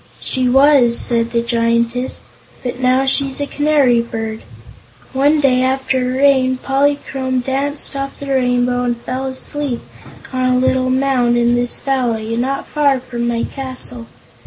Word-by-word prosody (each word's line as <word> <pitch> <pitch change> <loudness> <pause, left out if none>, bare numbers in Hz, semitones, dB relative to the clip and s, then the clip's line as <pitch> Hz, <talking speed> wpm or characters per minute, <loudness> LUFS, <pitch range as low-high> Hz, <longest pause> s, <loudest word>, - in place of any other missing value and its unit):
"She 255 -1 -1
was," 270 -2 +5
said 230 -1 0
the 235 0 0
Giantess; 235 +1 0 0.4
"but 245 0 -4
now 255 +1 +2
she's 270 0 +1
a 285 - -1
canary 285 -5 +2
bird. 225 -1 -5 0.7
One 285 +3 +3
day 260 -3 +3
after 265 0 0
a 255 0 -1
rain, 265 -2 +3
Polychrome 270 -1 -1
danced 275 +3 -2
off 275 0 -5
the 280 - -7
Rainbow 245 -1 +1
and 240 -1 -1
fell 255 +3 -4
asleep 265 0 -3 0.5
on 255 0 +1
a 250 - +2
little 255 0 +1
mound 255 -2 +2
in 240 0 +3
this 245 0 +1
valley, 230 -5 -1
not 260 +4 -2
far 285 -3 +1
from 240 -2 -4
my 235 -1 -1
castle. 255 -3 -6
255 Hz, 150 wpm, -17 LUFS, 240-270 Hz, 0.7 s, was